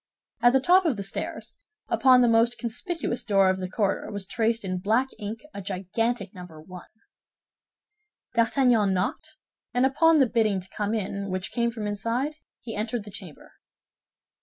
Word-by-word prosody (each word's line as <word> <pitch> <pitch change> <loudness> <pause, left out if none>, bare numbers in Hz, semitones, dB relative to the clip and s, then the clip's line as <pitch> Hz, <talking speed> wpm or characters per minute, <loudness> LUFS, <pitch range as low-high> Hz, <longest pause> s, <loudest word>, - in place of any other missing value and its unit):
At 240 +1 +5
the 265 - +5
top 360 +7 +4
of 290 -9 +1
the 200 - -4
stairs, 195 - -5 0.3
upon 255 +2 +5
the 245 - +5
most 230 +1 +3
conspicuous 245 - -3
door 195 -3 +4
of 190 - -3
the 185 -1 -4
corridor, 200 +1 -1
was 200 -2 -5
traced 225 +1 -1
in 185 -1 -2
black 225 +8 +1
ink 215 +1 -5
a 200 - -6
gigantic 195 +3 -2
number 180 -4 -11
"1." 180 +3 -11 1.5
D'Artagnan 230 -4 +3
knocked, 185 - -3 0.4
and 250 +1 +4
upon 320 +4 +4
the 270 - +6
bidding 220 -5 +1
to 185 +1 -13
come 210 +1 -1
in 200 -1 -3
which 185 +1 -4
came 235 -1 +1
from 225 -2 -5
inside, 230 +8 -2 0.3
he 225 - -7
entered 220 +1 -2
the 205 - -11
chamber. 185 -6 -11
220 Hz, 165 wpm, -26 LUFS, 195-245 Hz, 1.5 s, the